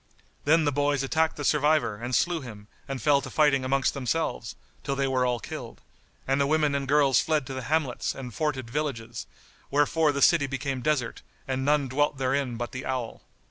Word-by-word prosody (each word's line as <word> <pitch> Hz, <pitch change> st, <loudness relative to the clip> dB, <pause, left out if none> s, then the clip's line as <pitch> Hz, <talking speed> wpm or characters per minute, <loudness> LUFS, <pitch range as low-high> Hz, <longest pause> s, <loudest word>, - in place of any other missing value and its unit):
Then 160 Hz, +2 st, +4 dB
the 145 Hz, -, +2 dB
boys 145 Hz, 0 st, +1 dB
attacked 160 Hz, +4 st, +1 dB
the 145 Hz, -, -6 dB
survivor 150 Hz, -7 st, +2 dB
and 120 Hz, +3 st, -3 dB
slew 175 Hz, -2 st, +1 dB
him 105 Hz, -5 st, -10 dB, 0.2 s
and 135 Hz, -2 st, -4 dB
fell 140 Hz, +4 st, +3 dB
to 130 Hz, -, -7 dB
fighting 140 Hz, -2 st, +3 dB
amongst 135 Hz, +1 st, +1 dB
themselves, 140 Hz, -2 st, -2 dB, 0.3 s
till 140 Hz, -, -2 dB
they 135 Hz, 0 st, 0 dB
were 130 Hz, -1 st, +1 dB
all 120 Hz, -1 st, 0 dB
killed; -, -, -8 dB, 0.5 s
and 135 Hz, +1 st, +2 dB
the 140 Hz, -, +2 dB
women 150 Hz, -1 st, +2 dB
and 140 Hz, -1 st, -2 dB
girls 140 Hz, -3 st, +4 dB
fled 155 Hz, -4 st, 0 dB
to 135 Hz, -, -6 dB
the 130 Hz, -, -4 dB
hamlets 155 Hz, -5 st, 0 dB
and 125 Hz, -3 st, -7 dB
forted 135 Hz, -4 st, -2 dB
villages; 120 Hz, -4 st, -4 dB, 0.4 s
wherefore 145 Hz, +2 st, +2 dB
the 140 Hz, -1 st, 0 dB
city 155 Hz, -5 st, +5 dB
became 135 Hz, -1 st, -3 dB
desert 135 Hz, -5 st, -1 dB, 0.3 s
and 130 Hz, 0 st, -1 dB
none 145 Hz, 0 st, +2 dB
dwelt 145 Hz, +2 st, 0 dB
therein 130 Hz, -2 st, -1 dB
but 120 Hz, -1 st, -4 dB
the 130 Hz, 0 st, -6 dB
owl. 130 Hz, -3 st, -4 dB
135 Hz, 195 wpm, -27 LUFS, 130-150 Hz, 0.5 s, city